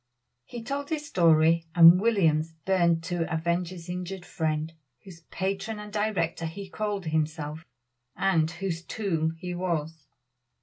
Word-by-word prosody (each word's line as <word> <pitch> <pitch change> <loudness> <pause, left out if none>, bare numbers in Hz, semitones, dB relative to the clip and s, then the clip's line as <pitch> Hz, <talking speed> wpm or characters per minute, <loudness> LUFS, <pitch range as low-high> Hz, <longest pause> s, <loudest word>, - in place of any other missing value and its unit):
He 240 -2 -8
told 280 +4 -4
his 310 -2 -2
story, 165 - +4
and 170 +2 +9
Williams 165 -8 +2
burned 170 -3 +2
to 175 -1 -2
avenge 170 +2 0
his 180 -2 -10
injured 180 +1 -5
friend, 155 -1 -2 0.3
whose 180 -4 -12
patron 195 +3 -3
and 210 0 -9
director 205 -6 -1
he 190 +4 -8
called 205 -3 -3
himself, 155 0 -2 0.5
and 175 -4 +2
whose 170 0 -4
tool 170 -6 -1
he 180 +1 -5
was. 160 -4 -3
175 Hz, 135 wpm, -27 LUFS, 160-195 Hz, 0.5 s, and